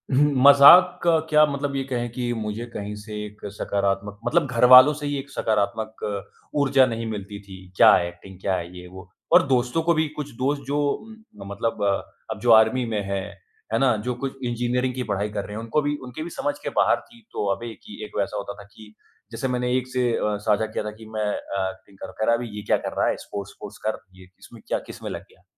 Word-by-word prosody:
हुँ, 145 +2 +4
मज़ाक 175 +6 +8
का 170 -1 +4
क्या 150 0 +6
मतलब 140 -1 -3
ये 135 - -1
कहें 120 -3 -3
कि 120 -1 -3
मुझे 110 0 -4
कहीं 105 0 -5
से 105 +1 -10
एक 105 0 -12
सकारात्मक 100 0 -2
मतलब 165 -1 +2
घर 120 0 +3
वालों 130 +4 +10
से 145 - -5
ही 145 0 -2
एक 140 +1 -9
सकारात्मक 110 -2 -2 0.6
ऊर्जा 135 -2 +4
नहीं 115 -1 -3
मिलती 100 -1 -6
थी। 95 -1 -10 0.2
क्या - - +8
है, 85 - +2
एक्टिंग 90 +2 -12
क्या 95 - 0
है? 90 0 -6
ये 90 - -11
वो। 95 +1 -12 0.2
और - - +7
दोस्तों 125 +3 +1
को 170 +1 +3
भी 160 -1 +1
कुछ 145 -1 -5
दोस्त 140 +2 0
जो 145 +1 -1 0.7
म - - -10
मतलब 105 +1 -2
अ, 100 -1 -1 0.2
अब - - -5
जो 120 - +3
आर्मी 110 +3 +5
में 110 -2 -2
है, 100 -1 -1 0.5
है 115 - +2
ना 130 -4 +3
जो 125 - -1
कुछ 135 -1 -4
इंजीनियरिंग 125 +1 -1
की 130 - -2
पढ़ाई 100 +1 -1
कर 105 -1 -4
रहे 105 - -8
हैं - - -4
उनको 115 +7 0
भी 145 0 -1
उनके 125 +5 -7
भी 170 - -6
समझ 145 -3 -3
के - - -2
बाहर - - +3
थी। 235 0 -18
तो - - -2
अबे 115 +2 -7
कि 105 - -11
एक - - -10
वैसा 100 +1 -2
होता 100 0 -5
था - - -11
कि 110 -1 -15 0.4
जैसे 130 - -3
मैंने 125 -1 -1
एक 130 0 -3
से 125 -1 0
अ, 105 -2 -1
साझा 105 +1 +3
किया 110 0 -4
था 105 - -4
कि, 110 +1 -14
"मैं 110 -1 -3
अ, 100 -2 -2
एक्टिंग 95 +1 -14
कर 95 0 -8
कह 110 - +1
रहा 115 - +4
अभी 120 0 -4
ये 105 - -5
क्या - - +5
कर - - -5
रहा - - +2
है - - 0
स्पोर्ट्स 100 -1 -7
-वोरट्स 105 - -9
कर।" 110 - -1 0.2
ये 95 - -14
इसमें - - -14
क्या, - - 0
किसमें - - -8
लग - - -5
गया। - - -25
115 Hz, 240 wpm, -24 LUFS, 105-135 Hz, 0.7 s, वालों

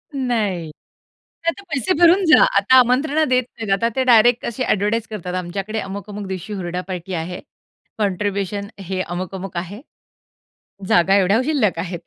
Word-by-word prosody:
नाही 210 - -1 0.8
आता 395 +4 -6
पैसे 300 +5 0
भरून 355 +3 +6
जा. 315 - +7
आता 205 +6 +5
आमंत्रण 275 +5 +2
देत 255 0 +3
नाहीत. 220 -3 -4
आता 230 +4 +1
ते 260 - +1
डायरेक्ट 240 0 +5
असे 235 +2 -3
एडव्हर्टाइज 210 +3 0
करतात. 180 -4 -5
आमच्याकडे 195 +4 -4
अमुक-अमुक 200 +1 -6
दिवशी 190 +2 -6
हुरडा 180 -2 -4
पार्टी 185 0 -6
आहे. 175 +1 -4 0.6
कॉन्ट्रिब्युशन 200 0 -2 0.2
हे 185 -1 -1
अमुक-अमुक 185 +1 -5
आहे. 190 +7 -6 1.1
जागा 185 +3 +4
एवढ्या 200 +5 +3
शिल्लक 225 - +1
आहेत. 175 0 -4
200 Hz, 145 wpm, -20 LUFS, 185-240 Hz, 1.1 s, जा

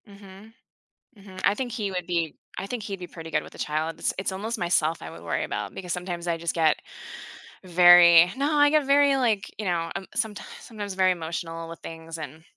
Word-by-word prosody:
Mhm. 200 +1 -14 0.6
Mhm, 195 -2 -11
I 200 - +3
think 245 +1 -4
he 205 -3 -3
would 180 -2 -3
be 170 -3 -1 0.2
I - - -4
think 235 +3 -5
he'd 200 -1 -5
be 180 - -6
pretty 165 -2 -10
good - - 0
with - - -13
a - - -12
child; 155 +2 -2
it's - - 0
it's 190 0 -2
almost 215 +5 -4
myself 170 -3 +1
I 80 - -7
would 85 0 -11
worry 85 - -2
about - - -4
because 180 -2 -5
sometimes 175 -1 -5
I 170 -1 0
just 170 0 -2
get 160 -2 +3 0.9
very 175 -1 +7
no, 285 +3 0
I 290 0 +6
get 305 -1 +2
very, 280 0 +4
like, 220 -6 0
you 215 - -5
know, 170 -2 -1
um, 195 - -4
sometimes 220 -3 -3
sometimes 205 -4 -7
very 185 0 +3
emotional 165 -1 -5
with 165 - -9
things 165 0 -8
and 155 0 -9
180 Hz, 215 wpm, -25 LUFS, 165-205 Hz, 0.9 s, very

